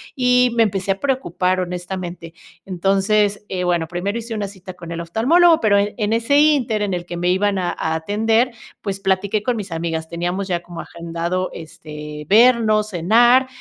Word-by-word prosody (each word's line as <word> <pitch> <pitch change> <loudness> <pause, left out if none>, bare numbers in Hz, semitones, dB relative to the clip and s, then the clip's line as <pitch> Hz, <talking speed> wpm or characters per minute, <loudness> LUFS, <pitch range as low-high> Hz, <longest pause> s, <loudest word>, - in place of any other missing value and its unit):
y 250 -1 +3
me 230 - +5
empecé 195 -2 -1
a 195 - -2
preocupar 185 -9 0
honestamente. 180 -1 -5 0.4
Entonces, 195 +3 +1
eh, 180 -1 -2
bueno 170 -2 0
primero 185 +6 -3
hice 230 0 -6
una 205 -1 -3
cita 190 -2 -11
con 170 -1 -10
el 170 0 -4
oftalmólogo 315 - +4
pero 205 -2 +3
en 205 +1 0
en 215 -1 0
ese 235 +6 +2
inter 265 -8 +2
en 195 -2 -2
el 175 -1 -3
que 175 -1 -6
me 175 +1 0
iban 195 +2 +1
a 180 -1 -1
a 160 0 -2
atender 220 +8 +1 0.3
pues 195 -2 -4
platiqué 195 +2 0
con 245 +1 -1
mis 200 -4 -6
amigas 165 -1 -3
teníamos 175 +3 -3
ya 175 -2 -1
como 175 -1 -10
agendado 170 +2 -4
este, 150 -1 -9
vernos, 215 -1 +4
cenar, 235 +8 +4
195 Hz, 180 wpm, -20 LUFS, 175-220 Hz, 0.4 s, me